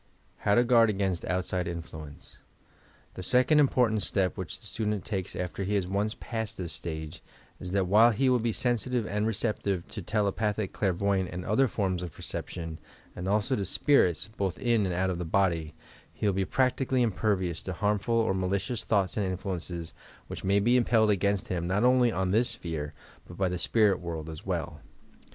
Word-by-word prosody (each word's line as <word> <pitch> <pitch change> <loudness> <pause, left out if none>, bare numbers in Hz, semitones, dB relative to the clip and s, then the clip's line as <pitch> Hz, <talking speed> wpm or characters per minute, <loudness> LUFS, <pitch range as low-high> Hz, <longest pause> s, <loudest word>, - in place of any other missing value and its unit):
HOW 100 - +2
TO 120 - +6
OUABD 115 -4 +4
A0AIN8T 95 -3 -1
ODTSIDE 90 -1 -1
INTLUENCEi: 80 -3 -8 0.8
The - - -7
second 130 - +4
important 125 -6 +3
step 95 -2 0
which - - -5
the - - -14
student 105 -4 -2
takes 95 -4 -3
after 90 +2 -3
he 100 +2 -1
has 100 -3 +1
once 100 +4 -1
passed 110 -2 -4
this 85 -4 -5
stage 80 +1 -6 0.4
is 90 - -6
that 100 -1 +2
while 105 +6 +6
he 120 +4 +1
will 125 -1 +4
be 115 0 0
sensitive 120 0 0
and 105 +4 -1
receptive 100 -4 -1
to 105 - -6
telepathic, 105 +1 -1
clairvoyant 95 -1 0
and 90 0 -6
other 120 +6 +3
forms 95 -6 -1
of 90 -3 -6
perception 80 -3 -6 0.4
and 90 +1 -5
also 105 +6 +1
to 100 - -2
spirits, 95 - +2
both 95 -3 -1
in 115 -5 +2
and 90 - -2
out 95 +1 +1
of 90 - -4
the - - -2
body, 80 -3 0 0.4
he - - -5
will 100 - +3
be 95 0 0
practically 130 +1 +1
impervioas 95 -6 -1
to 95 - -5
harmful 105 +5 0
or 115 -3 +2
malicious 95 +4 -1
thoughts 100 -2 +1
and 105 - +1
influences 90 -3 -4 0.3
which - - -8
may 100 +2 +3
be 120 +5 +4
impelled 110 -3 +3
against 100 0 0
him 85 -2 -2
not 100 +5 +1
only 125 -1 +4
on 95 -2 -1
this 115 +4 +3
sphere, 75 -3 -5 0.3
but 85 - -11
by 95 - +1
the 90 -1 -2
spirit 105 -1 +3
world 80 -2 -5
as 80 - -9
well. - - -3
100 Hz, 185 wpm, -28 LUFS, 90-110 Hz, 0.8 s, TO